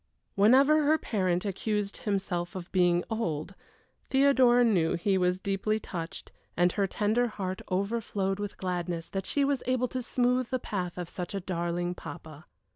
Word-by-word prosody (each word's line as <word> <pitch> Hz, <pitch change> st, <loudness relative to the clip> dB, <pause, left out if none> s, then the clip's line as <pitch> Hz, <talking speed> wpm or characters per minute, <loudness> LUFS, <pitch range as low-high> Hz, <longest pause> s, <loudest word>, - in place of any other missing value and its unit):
Whenever 270 Hz, +9 st, +5 dB
her 305 Hz, +2 st, +4 dB
parent 185 Hz, -, -1 dB
accused 205 Hz, +1 st, -2 dB
himself 195 Hz, -4 st, -2 dB
of 180 Hz, -1 st, -7 dB
being 175 Hz, -2 st, +3 dB
"old," 170 Hz, -6 st, -2 dB, 0.6 s
Theodora 260 Hz, -3 st, +5 dB
knew 180 Hz, -9 st, +2 dB
he 195 Hz, +3 st, +1 dB
was 180 Hz, -1 st, +2 dB
deeply 200 Hz, +3 st, -1 dB
touched, 170 Hz, -5 st, -6 dB, 0.3 s
and 175 Hz, +1 st, +4 dB
her 200 Hz, 0 st, 0 dB
tender 220 Hz, +5 st, +1 dB
heart 190 Hz, -4 st, -4 dB
overflowed 200 Hz, 0 st, -1 dB
with 205 Hz, -1 st, -5 dB
gladness 175 Hz, -2 st, -3 dB
that 195 Hz, 0 st, -3 dB
she 285 Hz, -1 st, +2 dB
was 275 Hz, -2 st, 0 dB
able 255 Hz, 0 st, +1 dB
to 255 Hz, -, -3 dB
smooth 250 Hz, 0 st, +1 dB
the 255 Hz, -, 0 dB
path 185 Hz, -7 st, -4 dB
of 175 Hz, -2 st, -4 dB
such 180 Hz, +2 st, -5 dB
a -, -, -1 dB
darling 175 Hz, -1 st, -2 dB
papa. 160 Hz, -2 st, -10 dB
195 Hz, 160 wpm, -29 LUFS, 175-235 Hz, 0.6 s, Whenever